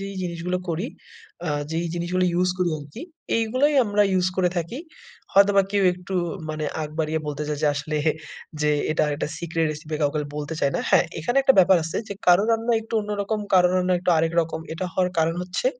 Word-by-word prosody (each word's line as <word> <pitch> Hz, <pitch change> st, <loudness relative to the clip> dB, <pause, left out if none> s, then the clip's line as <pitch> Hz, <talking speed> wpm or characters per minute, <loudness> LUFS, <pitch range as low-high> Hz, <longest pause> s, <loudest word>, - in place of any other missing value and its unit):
যেই 195 Hz, 0 st, -6 dB
জিনিসগুলা 175 Hz, +1 st, -2 dB
করি, 170 Hz, +6 st, -1 dB, 0.6 s
আ -, -, 0 dB, 0.2 s
যেই 165 Hz, +1 st, -1 dB
জিনিসগুলা 180 Hz, +2 st, 0 dB
ইউজ 180 Hz, +1 st, +2 dB
করি 180 Hz, -2 st, +1 dB
আরকি। 145 Hz, -, -10 dB, 0.4 s
এগুলোই 255 Hz, +7 st, +2 dB
আমরা 205 Hz, 0 st, +2 dB
ইউজ 185 Hz, -1 st, +2 dB
করে 185 Hz, -2 st, +3 dB
থাকি। 170 Hz, -, -3 dB, 0.5 s
হয়তোবা 200 Hz, 0 st, +5 dB
কেউ 205 Hz, -1 st, +1 dB
একটু 180 Hz, +1 st, -7 dB, 0.4 s
মানে 155 Hz, 0 st, -4 dB, 0.2 s
আগ 150 Hz, -, -5 dB
বাড়িয়ে 160 Hz, 0 st, 0 dB
বলতে 150 Hz, 0 st, -3 dB
যায় 150 Hz, -, -2 dB
যে, -, -, +3 dB
আসলে 150 Hz, +1 st, -3 dB, 0.6 s
যে 150 Hz, 0 st, +2 dB, 0.2 s
এটা 155 Hz, -, +1 dB
আর 150 Hz, -, -1 dB
একটা 150 Hz, -, -3 dB
সিক্রেট 165 Hz, -1 st, -1 dB
রেসিপি, 155 Hz, +1 st, -6 dB
কাউকে 145 Hz, +1 st, +1 dB, 0.2 s
বলতে 150 Hz, +2 st, -4 dB
চাই 140 Hz, -, +2 dB
না। -, -, -1 dB
হ্যাঁ, -, -, +5 dB
এখানে 210 Hz, -, -2 dB
একটা 270 Hz, -1 st, +5 dB
ব্যাপার 190 Hz, 0 st, +7 dB
আছে 165 Hz, -, -4 dB
যে, -, -, -3 dB
কারো 180 Hz, +2 st, +6 dB
রান্না 230 Hz, +1 st, +1 dB
একটু 225 Hz, +1 st, -7 dB
অন্যরকম, 210 Hz, +1 st, -2 dB, 0.2 s
কারো 180 Hz, -1 st, +6 dB
রান্না 185 Hz, 0 st, +2 dB
একটু 180 Hz, 0 st, 0 dB
আরেক 165 Hz, +1 st, +1 dB
রকম। 160 Hz, -1 st, -3 dB
এটা 165 Hz, +3 st, -4 dB
হওয়ার 180 Hz, -1 st, +1 dB
কারণ 165 Hz, +1 st, +2 dB
হচ্ছে, 185 Hz, -, -3 dB
180 Hz, 200 wpm, -24 LUFS, 160-195 Hz, 0.6 s, ব্যাপার